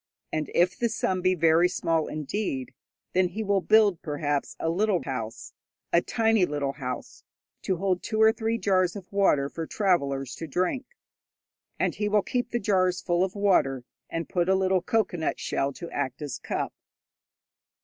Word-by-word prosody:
And 155 -1 -1
if 180 +1 +3
the 235 - 0
sum 190 -4 -1
be 185 0 +3
very 165 +1 +4
small 165 -3 0
indeed, 150 -3 -3 0.4
then 185 0 +3
he 215 +5 -4
will 200 -2 +2
build, 210 -4 +4
perhaps, 145 -2 -2
a - - -2
little 190 +2 +1
house 115 -5 -5 0.4
a 170 - +5
tiny 225 -2 +2
little 145 -4 0
house 125 -3 -6 0.4
to 190 - 0
hold 185 0 0
two 220 -1 -3
or 220 0 +7
three 225 0 -1
jars 185 -4 +2
of 195 -3 -9
water 170 -9 +3
for 165 +2 -6
travellers 140 - 0
to 165 - -6
drink. 185 - -1 0.9
And - - +1
he 210 -1 -1
will 205 -1 +3
keep 245 -1 -2
the 240 - -1
jars 185 -3 +2
full 175 0 +1
of 190 +1 -2
water, 180 -11 +2 0.3
and 165 0 -3
put 175 0 0
a 190 - +5
little 190 -1 +2
cocoanut 180 -5 0
shell 140 - -1
to 170 +5 -8
act 140 +1 -3
as 145 -4 -5
cup. - - -3
180 Hz, 170 wpm, -27 LUFS, 150-200 Hz, 0.9 s, or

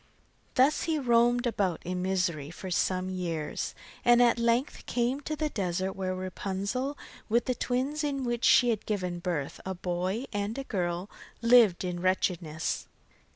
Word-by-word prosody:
Thus 275 +4 +4
he 325 -2 +1
roamed 240 -2 +3
about 195 -8 0
in 180 +1 -2
misery 180 -6 0
for 185 +3 -7
some 185 +1 0
years, 170 -5 -3 0.3
and 240 0 +6
at 240 -1 +4
length 235 +4 0
came 250 +3 0
to 310 +2 -3
the 305 0 -1
desert 185 -4 -2
where 185 -1 -2
Rapunzel, 200 +8 -3 0.3
with 235 +2 +2
the 255 - +1
twins 260 +5 -1
to 295 -1 0
which 240 -3 -2
she 245 -2 +6
had 220 - -3
given 180 -4 -2
birth, 170 -6 -3
a 190 0 -4
boy 180 +6 -2
and 205 +3 -2
a 275 - -3
girl, 180 -5 -2 0.4
lived 230 -7 +6
in 180 -1 -3
wretchedness. 175 -3 -1
200 Hz, 155 wpm, -29 LUFS, 180-245 Hz, 0.4 s, and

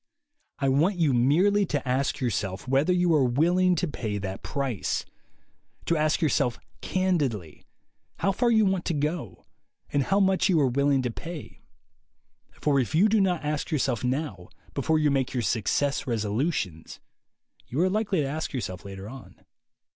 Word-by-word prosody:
I 140 - 0
want 155 +9 +3
you 160 -6 +2
merely 175 +12 +3
to 145 -4 -2
ask 130 +2 0
yourself 100 -4 -2
whether 135 +6 +2
you 180 -1 +3
are 150 -3 +4
willing 175 +9 +3
to 175 - -1
pay 110 -8 -3
that 95 -1 -5
price; 135 -8 -2 0.8
to 170 - +1
ask 155 0 +1
yourself 125 -6 +1 0.2
candidly 145 - -1 0.5
how 195 - +1
far 240 +5 +1
you 220 -2 +4
want 190 -2 0
to 165 - -1
go 145 - -3 0.5
and 145 - +3
how 195 +9 +1
much 190 -1 +3
you 170 -4 +4
are 145 - +4
willing 140 +1 +2
to 125 - -1
pay; 165 +4 -8 1.0
for 140 -2 +2
if 130 +4 -1
you 190 +7 +5
do 215 -1 +3
not 180 -5 0
ask 150 +2 -2
yourself 130 -8 0
now, 125 - -3 0.2
before 160 - +1
you 150 -2 +2
make 135 -2 0
your 120 - 0
Success 120 +8 0
resolutions, 110 - -2 0.7
you 130 - -3
are 180 - +4
likely 200 -3 0
to 140 - -1
ask 155 +3 -4
yourself 95 -9 -4
later 95 0 -8
on. 130 +3 -12
145 Hz, 165 wpm, -26 LUFS, 120-175 Hz, 1.0 s, you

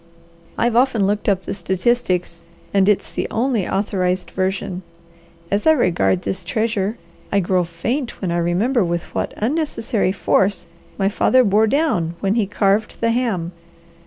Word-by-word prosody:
I've 235 0 +1
often 245 -5 +3
looked 205 +1 0
up 190 -2 +1
the - - -4
statistics 185 -2 -1 0.3
and 195 0 +4
it's 205 - +1
the - - -2
only 230 -4 0
authorized 185 -2 -1
version. 185 -1 -2 0.7
As 205 +8 0
I 315 - +8
regard 185 - +1
this 190 -1 -3
treasure, 215 +2 -1 0.3
I 200 - +3
grow 180 -1 +1
faint 230 - -3
when 185 -3 -2
I 170 - 0
remember 200 +8 +1
with 170 -1 -1
what - - -2
unnecessary 230 - 0
force 195 0 +1 0.3
my 195 - +1
father 255 +5 +3
bore 215 +1 +3
down 210 - 0
when 195 0 +1
he 220 -3 +1
carved 200 +2 0
the 230 0 +2
ham. 220 -9 -1
200 Hz, 155 wpm, -20 LUFS, 185-230 Hz, 0.7 s, I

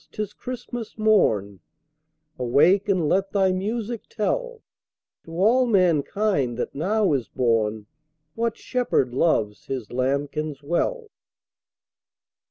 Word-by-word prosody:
't - - -15
is 210 - -9
Christmas 245 -2 -7
morn 110 - +2 0.8
Awake 165 - +3
and 180 -5 +2
let 195 +4 +1
thy 190 -2 +3
music 220 +4 -3
tell 485 - -2 0.6
To 165 - -11
all 235 +8 +3
mankind 180 - +1
that - - -3
now 195 +3 +1
is 130 -4 -1
born 110 -3 0 0.5
What 230 -1 -2
Shepherd 240 - 0
loves 110 -8 +1
His 130 -5 -5
lambkins 140 +3 -2
well!" 435 - -1
185 Hz, 110 wpm, -24 LUFS, 135-220 Hz, 0.8 s, Awake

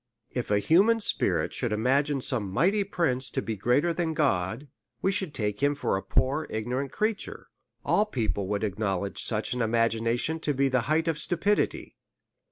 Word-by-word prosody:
If 125 - -3
a 105 - +3
human 195 - +4
spirit 215 - 0
should 120 -3 -2
imagine 135 +6 +1
some 120 -7 -1
mighty 190 - +2
prince 135 -10 -1
to - - -2
be 110 - -3
greater 125 - +2
than 165 -1 -1
God, 115 - 0 0.4
we 195 - +3
should 190 -4 -2
take 105 -4 -2
it 145 +1 +3
for 145 - 0
a 95 - -1
poor 145 +9 0
ignorant 125 +5 -3
creature; 215 -1 -2 0.4
all 210 +1 +3
people 110 - -2
would 105 +1 -1
acknowledge 100 -2 -2
such 110 0 -1
an 125 - -2
imagination 115 +6 +1
to 150 -3 -1
be 135 +1 +2
the 130 -1 +2
height 160 +2 +2
of 160 -2 0
stupidity. 175 +5 0
130 Hz, 175 wpm, -27 LUFS, 110-160 Hz, 0.4 s, human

